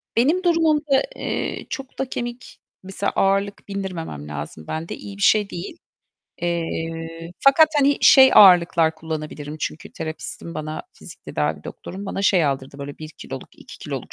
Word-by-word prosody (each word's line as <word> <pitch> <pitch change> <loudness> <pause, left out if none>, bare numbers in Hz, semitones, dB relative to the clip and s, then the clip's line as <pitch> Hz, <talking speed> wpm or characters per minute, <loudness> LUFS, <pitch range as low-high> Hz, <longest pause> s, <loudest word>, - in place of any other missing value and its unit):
benim 310 +11 +3
durumumda, 310 -5 +3
eee, - - -3
çokta 270 -2 -5
kemik 240 0 -6 0.2
mesela 195 +1 -2
ağırlık 195 +1 +1
bindirmemem 180 - -5
lazım 75 +1 -7
bende. 160 +1 -4
İyi 200 -1 -10
bir - - -9
şey 205 +1 +4
değil. 175 - -7 0.7
Eee, 165 -1 -3
fakat, 310 +3 +6
hani, 280 0 +3
şey 265 -1 +8
ağırlıklar 170 -4 +7
kullanabilirim, 155 -2 -6
çünkü 150 - -5
terapistim 160 +1 -6
bana, 155 0 -5
fizik - - -13
tedavi - - -2
doktorum 195 +1 -8
bana 195 - -3
şey 185 -4 +4
aldırdı 135 -1 -3
böyle 140 0 -7
1 155 0 -7
kiloluk, - - -9
2 - - -13
kiloluk - - -6
180 Hz, 145 wpm, -22 LUFS, 160-240 Hz, 0.7 s, şey